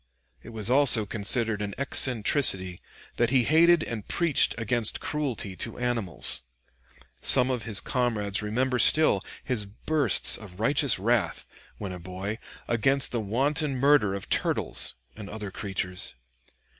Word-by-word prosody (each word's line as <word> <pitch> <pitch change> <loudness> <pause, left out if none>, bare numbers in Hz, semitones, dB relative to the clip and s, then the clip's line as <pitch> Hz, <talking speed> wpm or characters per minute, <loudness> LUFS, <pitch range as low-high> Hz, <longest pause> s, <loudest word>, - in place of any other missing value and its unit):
It - - -13
was 110 -3 -5
also 125 -4 +4
considered 110 +1 +1
an 100 -1 -5
eccentricity 115 -8 +1 0.4
that 120 -1 +1
he 130 -1 +2
hated 165 +4 +3
and 110 -3 -7
preached 170 -5 +1
against 115 0 +1
cruelty 130 -10 -4
to 115 - -5
animals. 120 -7 -2 0.8
Some 130 0 +4
of 120 -4 -4
his 110 -4 +4
comrades 110 -6 -2
remember 125 +4 -2
still 135 -4 +4 0.2
his 110 -6 -3
bursts 130 - +4
of 100 -3 -13
righteous 140 +3 +1
wrath, 115 +3 -1 0.3
when 100 -3 -7
a 90 - -8
boy, 95 +5 -7 0.3
against 135 +4 0
the 120 - -3
wanton 135 +7 -1
murder 135 -7 +2
of 100 - -7
turtles - - -1 0.2
and 100 -2 -10
other 105 -2 -7
creatures. 95 -2 -5
115 Hz, 135 wpm, -25 LUFS, 100-135 Hz, 0.8 s, also